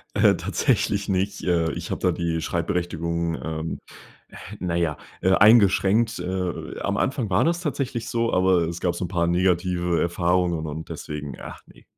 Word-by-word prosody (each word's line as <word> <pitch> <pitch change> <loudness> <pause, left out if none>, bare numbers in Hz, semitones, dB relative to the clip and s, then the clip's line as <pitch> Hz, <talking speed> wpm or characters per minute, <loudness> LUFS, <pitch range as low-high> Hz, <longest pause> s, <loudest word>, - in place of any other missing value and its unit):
Äh, - - +5
tatsächlich 100 0 0
nicht. 95 +1 -1
Äh, 85 -3 +1
ich - - -6
habe - - -2
da - - +3
die 85 -1 -2
Schreibberechtigung, 85 -1 -2
ähm, 80 0 -4 0.8
naja, 85 -4 -1 0.2
äh, 95 - +3
eingeschränkt. 105 +1 +5
Äh, 90 0 -4
am 100 0 -1
Anfang 130 -3 -1
war 90 - +3
das 170 +1 +1
tatsächlich 135 -7 -3
so, 115 0 0
aber 90 -2 +3
es 85 +1 -5
gab 85 -1 0
so 90 - -3
'n - - -4
paar 85 -1 0
negative 90 -1 +1
Erfahrungen 85 -1 +1
und 80 +2 -6
deswegen, 75 -2 -6
ach - - -9
ne. - - -19
90 Hz, 160 wpm, -24 LUFS, 85-100 Hz, 0.8 s, Äh